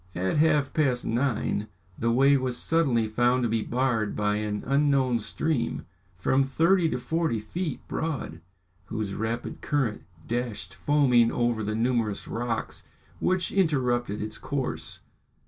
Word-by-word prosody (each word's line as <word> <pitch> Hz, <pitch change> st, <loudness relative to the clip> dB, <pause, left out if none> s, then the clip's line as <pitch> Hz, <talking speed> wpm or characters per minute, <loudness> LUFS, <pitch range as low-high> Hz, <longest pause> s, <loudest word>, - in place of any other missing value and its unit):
At 95 Hz, +9 st, 0 dB
half 150 Hz, -3 st, +3 dB
past 130 Hz, -6 st, +1 dB
nine 115 Hz, -3 st, 0 dB, 0.3 s
the 115 Hz, -, 0 dB
way 135 Hz, +4 st, +5 dB
was 130 Hz, -2 st, -1 dB
suddenly 140 Hz, -9 st, +2 dB
found 120 Hz, +3 st, +2 dB
to 120 Hz, -, +1 dB
be 115 Hz, 0 st, +1 dB
barred 120 Hz, -3 st, 0 dB
by 105 Hz, 0 st, +1 dB
an 105 Hz, -1 st, -3 dB
unknown 135 Hz, -3 st, +2 dB
stream, 120 Hz, +2 st, -2 dB, 0.3 s
from 130 Hz, +9 st, +2 dB
thirty 165 Hz, +6 st, +3 dB
to -, -, -1 dB
forty 160 Hz, +1 st, -1 dB
feet 155 Hz, -, -4 dB
broad, 135 Hz, -, -3 dB, 0.4 s
whose 110 Hz, -1 st, -3 dB
rapid 115 Hz, +2 st, -3 dB
current 135 Hz, -8 st, 0 dB, 0.3 s
dashed 115 Hz, -5 st, -3 dB
foaming 120 Hz, +3 st, +3 dB
over 120 Hz, -2 st, 0 dB
the 105 Hz, +1 st, -2 dB
numerous 115 Hz, -3 st, 0 dB
rocks 115 Hz, -1 st, -3 dB, 0.4 s
which 185 Hz, -1 st, 0 dB
interrupted 125 Hz, -, +1 dB
its 110 Hz, 0 st, -6 dB
course. 140 Hz, -2 st, -4 dB
120 Hz, 135 wpm, -27 LUFS, 110-140 Hz, 0.4 s, way